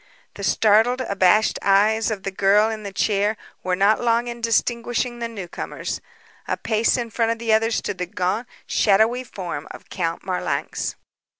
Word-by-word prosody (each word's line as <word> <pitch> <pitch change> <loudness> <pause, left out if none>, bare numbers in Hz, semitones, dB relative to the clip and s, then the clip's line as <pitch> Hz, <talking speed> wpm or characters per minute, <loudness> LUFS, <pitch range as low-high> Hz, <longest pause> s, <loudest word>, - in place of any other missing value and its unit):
The - - -9
startled, 225 +4 +3
abashed 200 -1 +3
eyes 215 +3 +3
of 205 -3 -4
the 195 - -3
girl 205 +3 +3
in 220 -1 -5
the 200 -1 -6
chair 205 +2 +1 0.2
were 185 0 0
not 200 +3 +3
long 235 0 +2
in 235 0 -6
distinguishing 240 +1 0
the 235 - -2
newcomers. 195 -7 -6 0.5
A - - -1
pace 225 +2 +1
in 235 -2 -4
front 230 0 +1
of - - -10
the 230 -1 0
others 225 +1 +2
stood 185 - -3
the 180 - -2
gaunt, 185 +7 -2 0.2
shadowy 220 +5 +3
form 175 - -6
of - - -12
Count 165 -3 -2
Marlanx. 185 -1 -2
220 Hz, 170 wpm, -22 LUFS, 195-230 Hz, 0.5 s, startled